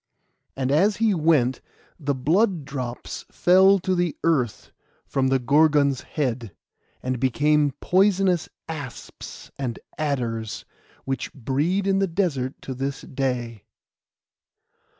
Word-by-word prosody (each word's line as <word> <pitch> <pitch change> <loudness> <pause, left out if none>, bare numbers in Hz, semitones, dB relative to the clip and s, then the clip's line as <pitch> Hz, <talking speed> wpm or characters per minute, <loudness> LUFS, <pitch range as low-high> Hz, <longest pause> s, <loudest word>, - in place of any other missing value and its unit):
And 130 0 0
as 195 +8 +3
he 225 -2 +3
went 150 -7 +2 0.4
the 140 -2 -1
blood 170 - +1
drops 130 -4 -5
fell 190 +2 +5
to 185 +1 0
the 175 -3 0
earth 135 -10 0 0.3
from 135 -1 0
the 135 0 +3
Gorgon's 140 +1 +3
head, 120 - -3 0.5
and 130 -1 -2
became 145 +3 +2
poisonous 185 -3 +2 0.2
asps 145 -6 -8
and 125 -4 -3 0.2
adders, 120 -7 -2 0.4
which 135 0 -3
breed 145 - 0
in 195 0 +2
the 195 - +2
desert 160 -8 -1
to 130 - -5
this 135 +2 -3
day. 125 -5 -3
145 Hz, 115 wpm, -24 LUFS, 130-175 Hz, 0.5 s, fell